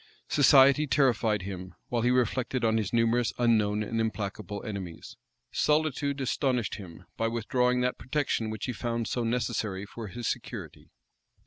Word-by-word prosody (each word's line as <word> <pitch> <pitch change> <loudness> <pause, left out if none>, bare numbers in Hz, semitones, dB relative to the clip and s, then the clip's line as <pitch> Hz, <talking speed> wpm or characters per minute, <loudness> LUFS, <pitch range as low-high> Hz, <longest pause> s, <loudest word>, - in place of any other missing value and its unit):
Society 140 +1 +6
terrified 115 -7 +2
him, 95 -1 -7
while 120 -2 0
he 120 - +2
reflected 125 0 +1
on 110 0 +3
his 105 -3 -2
numerous, 115 0 +2
unknown, 110 -3 +2
and 115 +1 -1
implacable 105 -2 -4
enemies: 95 -6 -7 0.4
solitude 150 -2 +1
astonished 125 -4 0
him, 90 -3 -11
by 115 - +1
withdrawing 125 +2 +1
that 125 0 -1
protection 130 -5 -1
which 110 0 -4
he 125 - -3
found 115 -1 -2
so 120 - -1
necessary 110 -4 -1
for 110 +1 -8
his 120 +3 -5
security. - - -5
115 Hz, 145 wpm, -28 LUFS, 105-125 Hz, 0.4 s, Society